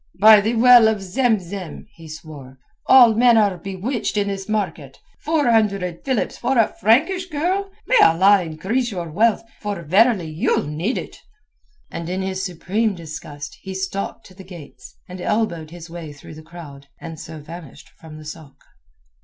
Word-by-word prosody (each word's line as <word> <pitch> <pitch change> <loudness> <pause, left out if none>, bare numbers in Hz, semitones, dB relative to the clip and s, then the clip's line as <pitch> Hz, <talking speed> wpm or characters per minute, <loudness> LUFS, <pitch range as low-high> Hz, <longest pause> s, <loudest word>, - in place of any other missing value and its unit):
"By 215 +1 +8
the 220 +4 -1
Well 240 -1 +7
of 220 -1 0
Zem 220 +4 0
Zem," 185 -1 -8
he 165 -1 -14
swore, 150 -4 -11 0.3
"all 245 -4 +7
men 235 +1 +4
are 200 -5 +2
bewitched 195 +6 -4
in 200 -1 0
this 195 0 -6
market. 180 -10 -3 0.2
Four 305 -2 0
hundred 200 -6 0
philips 260 -4 -2
for 255 +2 0
a 225 - +4
Frankish 325 - +2
girl! 365 +6 -1 0.2
May - - +3
Allah 190 +4 +5
increase 190 +10 -2
your 175 -6 -6
wealth, 220 +6 +2 0.2
for 205 -5 -5
verily 195 - +3
you'll 155 - -1
need 160 - -2
it." - - -8 0.7
And 170 0 -6
in 185 +1 -2
his 190 0 -3
supreme 195 +4 -2
disgust 155 -3 -9
he 190 -1 -7
stalked 195 +3 -4
to 190 - -15
the 190 +1 -13
gates, 150 -9 -13
and 180 0 -9
elbowed 175 -7 -2
his 170 0 -11
way 165 -3 -9
through 140 +2 -13
the 155 - -11
crowd, 155 -4 -12
and 165 -2 -9
so 160 -1 -9
vanished 155 -1 -12
from 155 -1 -14
the 155 - -11
sôk. 150 -2 -10
190 Hz, 170 wpm, -21 LUFS, 160-220 Hz, 0.7 s, By